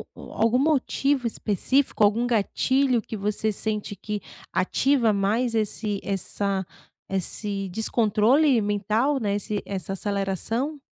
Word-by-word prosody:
algum 230 Hz, +3 st, 0 dB
motivo 275 Hz, -2 st, +1 dB
específico, 230 Hz, +3 st, +1 dB
algum 225 Hz, +4 st, +3 dB
gatilho 250 Hz, +3 st, +2 dB
que 220 Hz, -, -7 dB
você 210 Hz, +2 st, -1 dB
sente 210 Hz, 0 st, -3 dB
que 210 Hz, +2 st, -5 dB, 0.3 s
ativa 235 Hz, +5 st, +2 dB
mais 220 Hz, +4 st, 0 dB
esse 210 Hz, -1 st, -1 dB
essa 195 Hz, 0 st, -2 dB, 0.4 s
esse 195 Hz, +1 st, -2 dB
descontrole 225 Hz, -, +3 dB
mental, 215 Hz, +7 st, +1 dB
né? 205 Hz, -4 st, 0 dB
Esse 205 Hz, 0 st, -2 dB
essa 195 Hz, -1 st, -4 dB
aceleração? 205 Hz, -, -2 dB
215 Hz, 110 wpm, -25 LUFS, 200-245 Hz, 0.4 s, algum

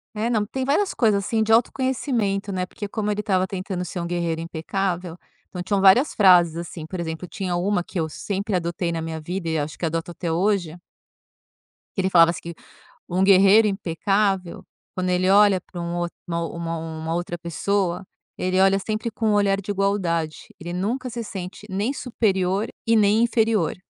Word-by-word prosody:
Eh, 220 Hz, +3 st, -1 dB
não, 215 Hz, -3 st, +1 dB
tem 265 Hz, +5 st, -4 dB
várias 300 Hz, +9 st, +1 dB
coisas, 205 Hz, -5 st, +2 dB
assim, 225 Hz, 0 st, 0 dB
de 220 Hz, -, +1 dB
autoconhecimento, 230 Hz, -4 st, +1 dB
né, 185 Hz, -1 st, -2 dB
porque 205 Hz, -, -7 dB
como 210 Hz, 0 st, -3 dB
ele 210 Hz, 0 st, -1 dB
estava 190 Hz, -2 st, +1 dB
tentando 185 Hz, -1 st, -4 dB
ser 180 Hz, +1 st, -5 dB
um 170 Hz, -, -3 dB
guerreiro 170 Hz, -2 st, -2 dB
impecável, 175 Hz, +1 st, -3 dB, 0.3 s
então 180 Hz, -1 st, -5 dB
tinham 200 Hz, 0 st, 0 dB
várias 200 Hz, +9 st, +5 dB
frases, 175 Hz, -5 st, +5 dB
assim, 170 Hz, -2 st, -6 dB
por 180 Hz, +2 st, -6 dB
exemplo, 160 Hz, +1 st, -4 dB
tinha 180 Hz, -1 st, -3 dB
uma 180 Hz, 0 st, 0 dB
que 180 Hz, -, -5 dB
eu 160 Hz, -, 0 dB
sempre 200 Hz, +6 st, -4 dB
adotei 170 Hz, 0 st, -1 dB
na 165 Hz, -, -3 dB
minha 160 Hz, 0 st, -4 dB
vida 170 Hz, +1 st, -4 dB
e 160 Hz, -, 0 dB
acho 150 Hz, +1 st, -3 dB
que 170 Hz, -, -3 dB
adoto 165 Hz, +2 st, -3 dB
até 170 Hz, 0 st, -4 dB
hoje 180 Hz, -2 st, 0 dB, 1.2 s
que -, -, +1 dB
ele 190 Hz, -, +1 dB
falava 170 Hz, -2 st, +6 dB
assim, 175 Hz, -, -6 dB
que 170 Hz, 0 st, -8 dB, 0.5 s
um 185 Hz, +2 st, +1 dB
guerreiro 200 Hz, +3 st, +6 dB
impecável 195 Hz, 0 st, -1 dB, 0.3 s
quando 185 Hz, 0 st, -1 dB
ele 180 Hz, +1 st, +2 dB
olha 200 Hz, -1 st, +6 dB
pra 175 Hz, -1 st, -8 dB
um 170 Hz, 0 st, -3 dB
outro 175 Hz, 0 st, -3 dB
uma 170 Hz, 0 st, -3 dB
uma 160 Hz, 0 st, -5 dB
outra 175 Hz, 0 st, -3 dB
pessoa, 180 Hz, +2 st, -1 dB, 0.3 s
ele 185 Hz, +1 st, +1 dB
olha 195 Hz, 0 st, +4 dB
sempre 215 Hz, +3 st, -3 dB
com 220 Hz, 0 st, -2 dB
um -, -, +3 dB
olhar 200 Hz, -1 st, +2 dB
de 205 Hz, -, -4 dB
igualdade, 185 Hz, -6 st, 0 dB, 0.2 s
ele 170 Hz, +1 st, -6 dB
nunca 235 Hz, +8 st, -2 dB
se 235 Hz, 0 st, -5 dB
sente 190 Hz, -1 st, -7 dB
nem 205 Hz, +7 st, -1 dB
superior 200 Hz, -5 st, 0 dB, 0.2 s
e 230 Hz, -, +4 dB
nem 215 Hz, +2 st, +4 dB
inferior, 225 Hz, -7 st, +1 dB
190 Hz, 190 wpm, -23 LUFS, 170-205 Hz, 1.2 s, falava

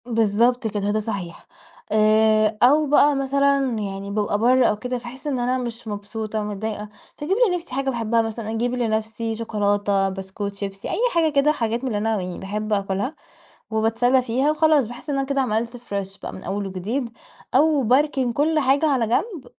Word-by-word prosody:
بالضبط 230 Hz, +1 st, +2 dB
كده، 205 Hz, -1 st, -1 dB
ده 215 Hz, -, +1 dB
صحيح. 200 Hz, -6 st, -5 dB, 0.4 s
آآ، 215 Hz, 0 st, +3 dB
أو 295 Hz, +5 st, +5 dB
بقى 290 Hz, 0 st, +5 dB
مثلًا 280 Hz, +1 st, +2 dB, 0.2 s
يعني 200 Hz, -1 st, -5 dB
بابقى 205 Hz, 0 st, 0 dB
برا 250 Hz, +3 st, +4 dB
أو 210 Hz, -, +1 dB
كده 250 Hz, +1 st, -3 dB
فاحس 245 Hz, +4 st, -9 dB
إن 270 Hz, -4 st, -1 dB
أنا 250 Hz, +1 st, 0 dB
مش 235 Hz, -2 st, -6 dB
مبسوطة 215 Hz, +1 st, -4 dB
متضايقة 210 Hz, 0 st, -4 dB, 0.3 s
فاجيب 340 Hz, +7 st, -1 dB
لنفسي 355 Hz, -6 st, -4 dB
حاجة 275 Hz, 0 st, 0 dB
باحبها 230 Hz, -2 st, +1 dB
مثلًا 225 Hz, -1 st, -4 dB
أجيب 235 Hz, +2 st, -1 dB
لنفسي 225 Hz, -1 st, -2 dB
شوكولاتة، 205 Hz, -3 st, 0 dB
بسكوت، 195 Hz, +1 st, -5 dB
شيبسي، 195 Hz, -1 st, -6 dB
أي -, -, -2 dB, 0.2 s
حاجة 325 Hz, -2 st, +3 dB
كده 285 Hz, +1 st, +3 dB
حاجات 230 Hz, -5 st, -1 dB
من -, -, -1 dB
اللي 220 Hz, -5 st, -1 dB
أنا 215 Hz, -1 st, 0 dB
يعني 180 Hz, -1 st, -5 dB
باحب 210 Hz, +2 st, -3 dB
آكلها. 200 Hz, +7 st, -1 dB, 0.6 s
وباتسلى 225 Hz, +4 st, +2 dB
فيها 255 Hz, +4 st, +1 dB
وخلاص 305 Hz, -4 st, +3 dB
باحس 245 Hz, +6 st, -8 dB
إن 280 Hz, -, 0 dB
أنا 270 Hz, -, -1 dB
كده 275 Hz, 0 st, 0 dB
عملت 235 Hz, -1 st, -1 dB
فريش 200 Hz, -4 st, -5 dB
بقى -, -, -7 dB
من 190 Hz, -, -9 dB
أول 200 Hz, 0 st, -3 dB
وجديد 215 Hz, +7 st, -3 dB, 0.4 s
أو 295 Hz, +1 st, +4 dB
باركن 260 Hz, +1 st, +2 dB
كل 310 Hz, +5 st, +1 dB
حاجة 280 Hz, +2 st, +3 dB
على 265 Hz, -6 st, +2 dB
جنب، 320 Hz, -, -1 dB
230 Hz, 180 wpm, -22 LUFS, 210-265 Hz, 0.6 s, أو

